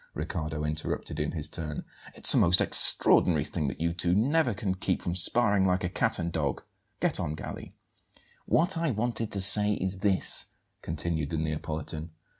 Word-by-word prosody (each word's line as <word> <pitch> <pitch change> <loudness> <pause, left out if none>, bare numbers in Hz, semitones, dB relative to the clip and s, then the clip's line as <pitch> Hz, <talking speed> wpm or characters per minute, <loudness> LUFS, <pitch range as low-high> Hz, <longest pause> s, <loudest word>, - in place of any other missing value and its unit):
Riccardo 80 -1 -4
interrupted 75 0 -4
in 75 0 -2
his 80 -2 -3
turn. 75 -2 -6 0.3
"It's - - +7
a - - +3
most 85 +2 +4
extraordinary 80 -5 +2
thing 75 0 -3
that 65 - -5
you 85 +1 -1
two 85 +1 0
never 130 +2 +1
can 95 -1 -2
keep 95 0 -2
from 85 - -4
sparring 100 +2 +4
like 90 0 +1
a 90 - -1
cat - - 0
and 85 0 -3
dog. 75 -5 -2 0.4
Get - - 0
on, 75 - -3
Galli!" - - -9 0.7
"What 175 +1 +1
I 165 -1 0
wanted 115 -1 -2
to 100 - 0
say 105 +2 +4
is 95 -1 -3
this," 100 -2 +2 0.3
continued 80 -1 -3
the 80 - -3
Neapolitan. 80 +1 -4
85 Hz, 175 wpm, -28 LUFS, 80-100 Hz, 0.7 s, It's